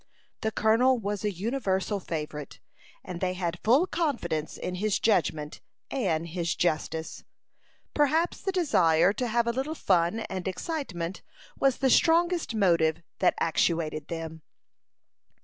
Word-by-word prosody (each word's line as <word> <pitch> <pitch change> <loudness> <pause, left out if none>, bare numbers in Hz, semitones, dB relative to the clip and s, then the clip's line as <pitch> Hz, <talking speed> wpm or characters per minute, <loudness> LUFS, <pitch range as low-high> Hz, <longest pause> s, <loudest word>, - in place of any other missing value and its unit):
The 220 - 0
colonel 230 +5 +3
was 205 -2 -3
a 210 - +1
universal 200 -1 -1
favorite, 150 -5 -6 0.4
and 175 -1 -7
they 185 -1 0
had 175 -2 -3
full 260 +10 +5
confidence 205 - -2
in 180 - -4
his 215 -2 +1
judgment 155 -7 0 0.3
and 170 -10 -1
his 170 0 -2
justice. 160 -1 -2 0.7
Perhaps 310 +4 +1
the 385 - -1
desire 185 - +3
to 245 +4 -2
have 235 +1 +1
a 235 - +1
little 270 +6 -2
fun 185 - +1
and 190 -3 -5
excitement 190 - -4 0.3
was 270 -2 +2
the 265 -1 +2
strongest 340 -4 +3
motive 170 -5 +2 0.2
that - - +3
actuated 160 -2 0
them. 160 -1 -6
190 Hz, 130 wpm, -28 LUFS, 165-255 Hz, 0.7 s, full